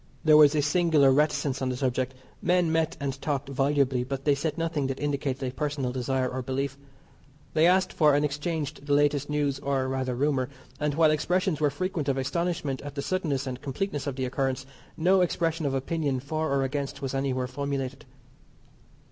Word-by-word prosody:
There 155 -1 +6
was 150 0 +7
a 150 - +2
singular 150 -3 +4
reticence 145 -1 +1
on 130 - 0
the 125 - -2
subject. 130 0 -1 0.3
Men 175 -2 +2
met 160 -1 0
and 135 -1 -3
talked 140 -2 -2
volubly, 135 -2 +1
but 135 +1 -5
they 145 - +5
said 150 +4 -2
nothing 165 -4 -1
that 135 0 -4
indicated 140 -2 -2
a 125 - -4
personal 145 -3 -2
desire 130 +1 -1
or 130 +1 -3
belief. 135 +2 -2 0.8
They 160 +2 +5
asked 185 +1 +3
for 150 -3 +4
and 145 +1 +2
exchanged 150 0 -3
the 145 - +2
latest 145 0 +2
news, 145 -2 0
or, 135 -2 0
rather, 130 -1 -2
rumour, 130 -1 0 0.3
and 150 -1 0
while 160 -1 +5
expressions 175 +1 0
were 150 - +4
frequent 160 -1 -2
of 135 - +1
astonishment 145 0 -1
at 145 0 -8
the 140 - -3
suddenness 155 -7 -1
and 130 -1 -5
completeness 145 +1 -3
of 140 - -2
the 130 -1 -2
occurrence, 130 0 -1 0.3
no 185 +3 +4
expression 165 -3 0
of 135 - -1
opinion 140 0 -1
for 155 +4 -2
or 140 -1 +2
against 140 +1 -3
was 135 - -2
anywhere 135 -2 0
formulated. 135 +1 -4
140 Hz, 190 wpm, -27 LUFS, 135-155 Hz, 0.8 s, was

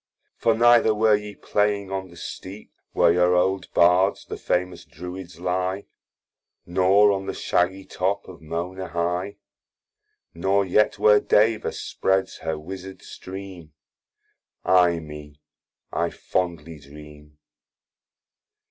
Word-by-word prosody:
For 115 - +1
neither 120 -1 +5
were 110 0 +3
ye 105 0 -6
playing 105 -1 -1
on 95 -1 -4
the 85 - -15
steep, 95 +5 -9 0.2
Where 85 - +4
your 90 0 +3
old 95 +1 0
Bards, 90 +3 +3
the - - -6
famous 90 0 -2
Druids 90 0 -9
ly, 90 +2 -2 0.8
Nor 95 +3 +4
on 95 -1 -3
the - - -4
shaggy 95 +2 0
top 95 +2 -2
of 90 -3 -12
Mona 90 +4 -5
high, 90 +4 -2 1.0
Nor 95 +4 +1
yet 105 +3 +2
where 105 -1 +5
Deva 110 +1 +2
spreads 95 0 -1
her 80 -1 -3
wisard 95 +4 -9
stream: 95 -4 -10 0.9
Ay 90 -2 +4
me, 75 -2 -11 0.5
I 85 0 0
fondly 85 -3 -4
dream! 75 +1 -15
95 Hz, 120 wpm, -24 LUFS, 85-95 Hz, 1.0 s, neither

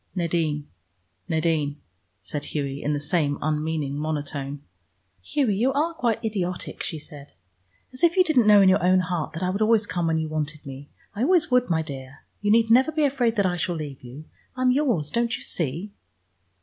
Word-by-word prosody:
"Nadine, 160 -4 -1 0.6
Nadine," 155 -3 0 0.4
said 145 -1 -3
Hughie, 140 -2 -3
in 150 - -1
the 145 - -1
same 145 -1 0
unmeaning 150 -2 -2
monotone. 145 -2 -4 0.6
"Hughie, 225 - 0
you 245 +7 +2
are 310 +4 0
quite 235 -8 -1
idiotic!" 185 -5 -3
she 160 - -3
said. 145 -1 -11 0.6
"As 255 - -6
if 340 +2 +4
you 370 - +7
didn't 275 -10 +3
know 205 -1 +8
in - - +5
your 185 - +3
own 185 +1 +4
heart 170 -4 -3
that 165 - -4
I 180 - +1
would 200 +3 -3
always 220 -1 +4
come 175 -4 -1
when 160 0 +1
you 160 0 -1
wanted 155 -1 -4
me. 135 +1 -9 0.3
I 210 - -3
always 330 +1 +3
would, 250 -2 +3
my 160 -2 +1
dear. 135 -2 -9 0.2
You 205 - 0
need 225 +1 +4
never 260 +6 +5
be 310 -1 +1
afraid 250 -5 +1
that 200 -3 +2
I 180 -1 0
shall 175 +1 -1
leave 145 -4 -6
you. 130 +5 -10 0.3
I 255 - -1
am 255 - +5
yours, 250 - +1
don't 235 -1 0
you - - -11
see?" 165 +6 -3
170 Hz, 200 wpm, -25 LUFS, 150-225 Hz, 0.6 s, know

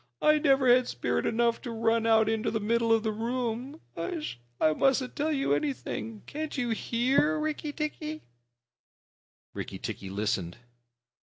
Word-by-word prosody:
"I 305 0 +4
never 270 -3 +4
had 250 0 +5
spirit - - -1
enough 235 0 +1
to - - -6
run 230 0 +1
out 220 -1 +5
into 220 0 0
the 220 - -1
middle 230 +2 +1
of 225 -1 +4
the 220 - 0
room. 240 +5 -3
H'sh! 325 - -4 0.2
I 155 - +4
mustn't 265 - +1
tell 310 +1 0
you 275 -2 +1
anything. 230 -6 -3
Can't 310 0 -5
you 245 -3 0
hear, 260 +8 +2
Rikki 305 -1 -2
tikki?" 305 +1 -4 1.3
Rikki - - -5
tikki 95 - -6
listened. 100 -3 -2
240 Hz, 145 wpm, -29 LUFS, 225-295 Hz, 1.3 s, had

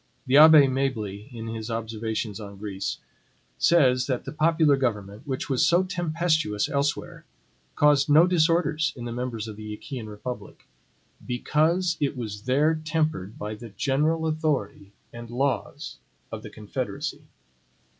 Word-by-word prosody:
The 130 - +2
Abbe 155 -1 +9
Mably, 115 -6 -2
in 115 -2 -7
his 115 0 -5
observations 110 -1 -3
on 100 -2 -9
Greece, 100 -1 -4 0.6
says 130 - +4
that 130 -3 -2
the - - -5
popular 160 -1 +3
government, 110 -2 -3
which 130 -2 -3
was 130 -3 +1
so 175 +2 +4
tempestuous 165 - 0
elsewhere, 140 +1 -2 0.5
caused 145 -1 +4
no 155 +4 +7
disorders 160 -4 +2
in 120 - -7
the 120 - -4
members 120 -2 -4
of 105 -2 -8
the 105 0 -6
Achaean 120 0 -7
republic, 110 +4 -8 0.6
BECAUSE 165 +8 +1
IT 145 -2 -1
WAS 105 -4 -5
THERE 150 +5 +2
TEMPERED 155 - -1
BY 105 +1 -5
THE 115 +2 -9
GENERAL 150 +9 0
AUTHORITY 150 - -2 0.2
AND 120 -1 -9
LAWS 130 +2 -2 0.3
OF - - -6
THE - - -9
CONFEDERACY. - - -5
130 Hz, 140 wpm, -25 LUFS, 110-155 Hz, 0.6 s, Abbe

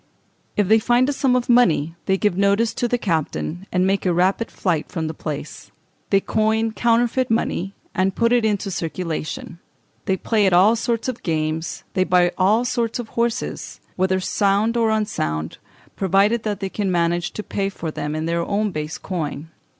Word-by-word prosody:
If 205 -2 +2
they 220 +2 +5
find 240 +3 +3
a - - 0
sum 265 -2 +2
of 250 -1 0
money 175 - +3
they 190 -1 +3
give 205 -3 +1
notice 200 +4 +2
to 240 - -1
the 245 - +1
captain, 175 -1 -2
and 180 0 +2
make 195 +1 +1
a 180 - +2
rapid 185 +6 +1
flight 165 -5 -2
from 165 -3 -3
the 155 - -3
place. 150 -2 -6 0.4
They 195 - +4
coin 220 +2 +1
counterfeit 240 +3 +1
money, 200 -4 -1 0.2
and 190 -1 0
put 230 0 +2
it 240 -2 +3
into 205 -2 0
circulation. 165 -1 -4 0.5
They 190 - +1
play 210 +1 +2
at 185 - +2
all 195 +6 +6
sorts 230 +1 -1
of 255 -2 -4
games; 160 -1 -2
they 185 - +2
buy 180 -1 +3
all 210 +6 +3
sorts 235 -2 -1
of 240 -3 -6
horses; 235 +1 -2 0.2
whether 190 0 +1
sound 200 +4 +1
or 230 -1 +2
unsound, 80 - -2 0.4
provided 200 +4 +2
they 205 -2 -2
can 195 -1 -2
manage 175 0 +1
to 215 - -5
pay 195 -1 -2
for 170 -4 -5
them 150 0 -4
in 155 0 -2
their 170 +1 0
own 205 +2 0
base 155 -1 -4
coin. 160 -4 -4
195 Hz, 180 wpm, -21 LUFS, 175-225 Hz, 0.5 s, all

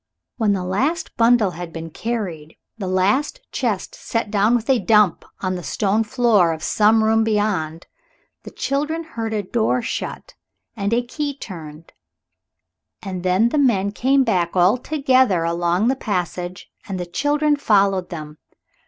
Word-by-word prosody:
When 215 -3 +2
the 190 -2 -2
last 270 - -1
bundle 230 -4 +4
had 175 0 -7
been 165 0 -7
carried, 180 -9 -5 0.2
the 205 -5 -5
last 200 - +1
chest - - -2
set 225 -3 -3
down 215 +3 +3
with 235 -1 -2
a 265 -3 +3
dump 210 -6 +3 0.2
on 185 -1 -1
the 180 - -4
stone 205 +5 0
floor 215 -7 +3
of 160 - -8
some 220 +1 +3
room 225 +1 +3
beyond, 205 -7 -1 0.6
the - - -10
children 300 +4 -2
heard 230 -8 -5
a 210 -2 -1
door 230 +4 0
shut - - -5 0.4
and 200 -2 -2
a 240 +1 +2
key 285 +2 -4
turned, 165 - -10 1.1
and 185 -3 -5
then 185 +5 +2
the 300 - 0
men 200 -8 +2
came 265 +5 +2
back 180 -8 0
all 185 +4 +5
together 260 - +2
along 170 +4 +1
the 265 - +2
passage, 180 -5 -4 0.2
and 190 -2 -4
the 180 - -3
children 290 - +1
followed 195 -8 +2
them. 150 -2 -8
210 Hz, 155 wpm, -21 LUFS, 180-240 Hz, 1.1 s, all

